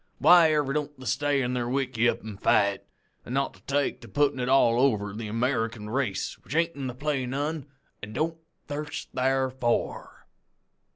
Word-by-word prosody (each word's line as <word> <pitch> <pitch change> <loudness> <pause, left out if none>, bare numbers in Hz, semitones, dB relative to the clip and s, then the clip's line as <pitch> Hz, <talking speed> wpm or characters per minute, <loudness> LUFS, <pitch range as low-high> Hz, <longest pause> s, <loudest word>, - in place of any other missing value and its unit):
Whyever 155 -5 +5
don't 150 -1 -3
they 130 - -10
stay 140 +2 +1
in 125 +1 -1
their 120 -1 -1
wickeyup 125 -4 0
an' 105 -3 -7
fight, 100 0 +2 0.4
an' 120 - -7
not 140 0 -1
take 140 0 0
to 120 - -11
puttin' 135 +6 +1
it 125 0 -1
all 120 -3 +4
over 105 -7 +2
the 110 +1 -5
American 115 -2 -1
race 115 -7 -2
which 145 - -8
ain't 165 0 +1
in 135 -2 -4
the 125 - -5
play' 140 -2 -1
none 145 +3 -3 0.3
an' 105 +1 -8
don't 160 +5 -1 0.3
thirst 145 +1 -5
tharfor? 130 -2 -1
130 Hz, 165 wpm, -27 LUFS, 120-145 Hz, 0.4 s, Whyever